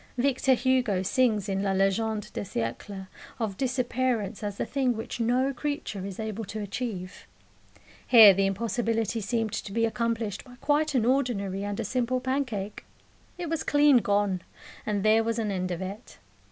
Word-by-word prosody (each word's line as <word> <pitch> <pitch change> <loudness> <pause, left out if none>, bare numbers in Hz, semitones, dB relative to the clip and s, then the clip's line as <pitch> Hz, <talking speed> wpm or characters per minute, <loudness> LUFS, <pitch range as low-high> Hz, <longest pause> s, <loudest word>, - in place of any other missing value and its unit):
Victor 260 +1 +3
Hugo 245 -7 +1
sings 220 -2 +1
in 195 -1 -1
La 195 -1 0
Legende 205 +2 +1
des - - -3
Siecles 190 - -4 0.3
of 220 -5 -2
disappearance 245 -4 -1
as 205 -1 -4
the - - -1
thing 260 -4 0
which 225 - -5
no 250 +4 +1
creature 270 -7 -4
is 195 0 -8
able 220 0 -4
to 215 +2 -6
achieve: 200 -3 -5 0.8
here 220 -5 +10
the 195 +1 +2
impossibility 225 +2 -1
seemed 225 0 -1
to 200 - -4
be 230 +2 +2
accomplished 230 -2 -2
by 250 -2 -14
quite 295 0 +1
an 235 -3 +3
ordinary 225 -7 0
and 205 +1 -3
a 230 - -2
simple 250 +3 0
pancake. 250 -6 -3 0.5
It 355 -1 -4
was 325 0 -1
clean 290 -2 +5
gone, 205 -4 +1 0.5
and 205 -2 0
there 220 +1 +4
was 230 0 -1
an 215 -3 -1
end 185 -1 -2
of 180 +1 -3
it. 200 +5 -8
225 Hz, 165 wpm, -27 LUFS, 200-250 Hz, 0.8 s, here